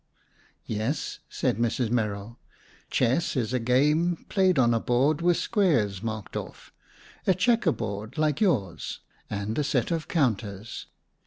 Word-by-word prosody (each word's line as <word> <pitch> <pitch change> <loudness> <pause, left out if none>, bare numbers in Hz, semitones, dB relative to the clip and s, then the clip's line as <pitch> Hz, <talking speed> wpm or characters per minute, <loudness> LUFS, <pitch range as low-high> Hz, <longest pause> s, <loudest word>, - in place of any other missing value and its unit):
"Yes," 110 +7 -2
said - - 0
Mrs. 115 0 0
Merrill. 105 -1 -2 0.5
"Chess 130 +8 +1
is 120 -2 -1
a 125 - +2
game, 150 +8 +2
played 185 -4 +3
on 120 -2 +4
a 115 - +2
board 135 +7 +2
with 175 0 +3
squares 140 - +1
marked 110 -2 -5
off,—a 190 - -5
checker 225 -1 +3
board, 105 +1 -5
like 155 -2 +1
yours,—and 100 - -2
a - - +2
set 140 0 0
of 165 -2 -1
counters. 110 - -1
125 Hz, 130 wpm, -27 LUFS, 110-160 Hz, 0.5 s, on